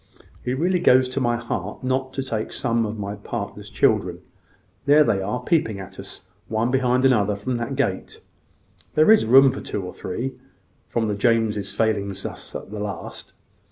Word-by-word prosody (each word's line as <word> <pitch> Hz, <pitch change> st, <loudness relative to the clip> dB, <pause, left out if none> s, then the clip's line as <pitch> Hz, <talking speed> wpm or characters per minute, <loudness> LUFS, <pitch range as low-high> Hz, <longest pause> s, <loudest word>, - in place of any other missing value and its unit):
It 125 Hz, +1 st, -1 dB
really 180 Hz, +4 st, +2 dB
goes 130 Hz, -6 st, +5 dB
to 130 Hz, -, -2 dB
my 120 Hz, -1 st, +2 dB
heart 105 Hz, -4 st, -5 dB
not 130 Hz, +1 st, -1 dB
to 135 Hz, -, -2 dB
take 110 Hz, -4 st, -3 dB
some 115 Hz, -3 st, 0 dB
of 110 Hz, +1 st, -5 dB
my 100 Hz, -1 st, -4 dB
partner's 100 Hz, -, -6 dB
children. -, -, +1 dB, 0.7 s
There 150 Hz, +2 st, +7 dB
they 100 Hz, -8 st, +1 dB
are, 110 Hz, +6 st, -3 dB
peeping 115 Hz, -10 st, +1 dB
at 95 Hz, 0 st, -10 dB
us, -, -, -8 dB, 0.2 s
one 110 Hz, +2 st, 0 dB
head -, -, -2 dB
behind 130 Hz, 0 st, +2 dB
another, 105 Hz, -6 st, +3 dB
from 120 Hz, +5 st, -2 dB
that 120 Hz, +3 st, -3 dB
gate. 100 Hz, -9 st, -2 dB, 0.8 s
There 155 Hz, +7 st, +6 dB
is 220 Hz, -, +5 dB
room 135 Hz, +3 st, +7 dB
for -, -, -6 dB
two 100 Hz, -, -4 dB
or 90 Hz, -, -7 dB
three, 120 Hz, +8 st, -4 dB, 0.5 s
from 115 Hz, -2 st, -1 dB
the 105 Hz, -, 0 dB
Jameses 105 Hz, -2 st, +1 dB
failing 105 Hz, -3 st, +1 dB
us 95 Hz, 0 st, -7 dB
at -, -, -7 dB
the 105 Hz, -, -5 dB
last. 105 Hz, -1 st, -6 dB
115 Hz, 185 wpm, -23 LUFS, 105-130 Hz, 0.8 s, There